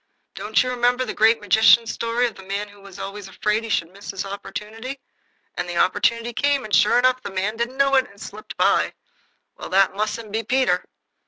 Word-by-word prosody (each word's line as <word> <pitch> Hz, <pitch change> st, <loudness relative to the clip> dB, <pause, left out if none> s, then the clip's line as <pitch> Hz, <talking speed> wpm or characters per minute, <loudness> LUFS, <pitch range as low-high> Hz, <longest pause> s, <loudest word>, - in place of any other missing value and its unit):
Don't -, -, +1 dB
you 250 Hz, -, -2 dB
remember 250 Hz, +1 st, +1 dB
the -, -, -4 dB
Great 225 Hz, +1 st, +4 dB
Magician's 220 Hz, +3 st, +5 dB
story 230 Hz, +1 st, 0 dB
of 235 Hz, -, -2 dB
the 195 Hz, -, -13 dB
man 200 Hz, +2 st, -4 dB
who 205 Hz, 0 st, -17 dB
was 195 Hz, -1 st, -13 dB
always 200 Hz, 0 st, -7 dB
afraid 210 Hz, +3 st, -1 dB
he 225 Hz, -, -7 dB
should 170 Hz, -4 st, -1 dB
miss 200 Hz, +1 st, -11 dB
his 195 Hz, -1 st, -4 dB
opportunity? 220 Hz, +6 st, -7 dB, 0.5 s
And 175 Hz, -, -4 dB
the 175 Hz, -, -4 dB
opportunity 230 Hz, +6 st, +1 dB
came, 285 Hz, +1 st, +1 dB
and, 215 Hz, -, -9 dB
sure 210 Hz, -, +5 dB
enough, 255 Hz, +1 st, +3 dB
the -, -, -6 dB
man 195 Hz, +3 st, -2 dB
didn't 235 Hz, +3 st, -3 dB
know 275 Hz, 0 st, +3 dB
it, 265 Hz, -1 st, +4 dB
and 200 Hz, -, -18 dB
it -, -, -20 dB
slipped 215 Hz, +2 st, -9 dB
by. -, -, +2 dB, 0.6 s
Well, -, -, -7 dB
that 195 Hz, 0 st, +3 dB
mustn't 215 Hz, +1 st, -3 dB
be 220 Hz, +2 st, -1 dB
Peter." 260 Hz, +4 st, +1 dB
220 Hz, 215 wpm, -22 LUFS, 200-245 Hz, 0.6 s, Magician's